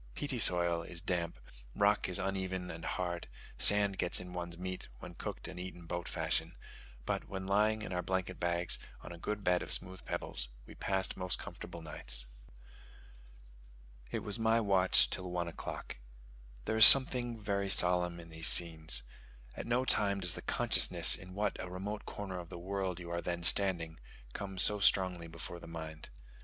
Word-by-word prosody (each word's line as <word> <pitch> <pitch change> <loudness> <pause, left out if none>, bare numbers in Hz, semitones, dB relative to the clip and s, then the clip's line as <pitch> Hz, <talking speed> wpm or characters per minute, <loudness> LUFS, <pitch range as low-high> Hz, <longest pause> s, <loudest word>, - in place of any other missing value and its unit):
Peaty 140 -4 -5
soil 85 -4 +4
is 85 0 -7
damp; 85 -1 -4 0.4
rock 100 -1 +1
is 90 - -2
uneven 95 -2 -4
and 80 +1 -10
hard; 85 -2 -4 0.3
sand 100 -2 +3
gets 90 - 0
into 90 0 -10
one's 85 -1 -7
meat, 95 +1 -7
when - - -11
cooked - - -7
and - - -9
eaten 90 -1 -9
boat 85 +1 -6
fashion; - - -3 0.5
but - - -4
when 95 -1 -6
lying 105 +2 0
in 95 - -7
our 90 - -2
blanket 95 0 -4
bags, 85 0 +1 0.2
on - - -11
a 85 - -11
good 105 +3 -5
bed 90 -1 +1
of - - -6
smooth 95 0 -1
pebbles, - - -2 0.2
we - - -13
passed 95 -1 -2
most 90 -1 -3
comfortable 85 - -10
nights. - - -2 1.8
It - - -5
was 105 +2 -4
my 115 +1 +2
watch 95 -4 +2
till 90 -1 -5
one 90 -1 -3
o'clock. 80 - -8 0.7
There 110 - -2
is 110 - +13
something 125 -3 +6
very 100 -2 -3
solemn 90 -2 +1
in 85 -1 -13
these 80 0 +4
scenes. 80 -8 +5 0.5
At - - -8
no 125 +2 0
time 100 -5 +3
does 90 -3 +6
the - - -3
consciousness - - +5
in 90 0 -11
what 105 0 -3
a 90 - -8
remote 100 +4 -7
corner 95 -3 -7
of 85 -1 -11
the - - -9
world 95 0 -4
you 85 -1 -9
are 85 0 -3
then 85 0 -5
standing, 85 -3 +2 0.3
come 95 -2 -7
so 105 +2 +7
strongly 90 -3 +1
before 85 +1 -8
the - - -13
mind. 80 -1 -9
90 Hz, 175 wpm, -32 LUFS, 85-100 Hz, 1.8 s, is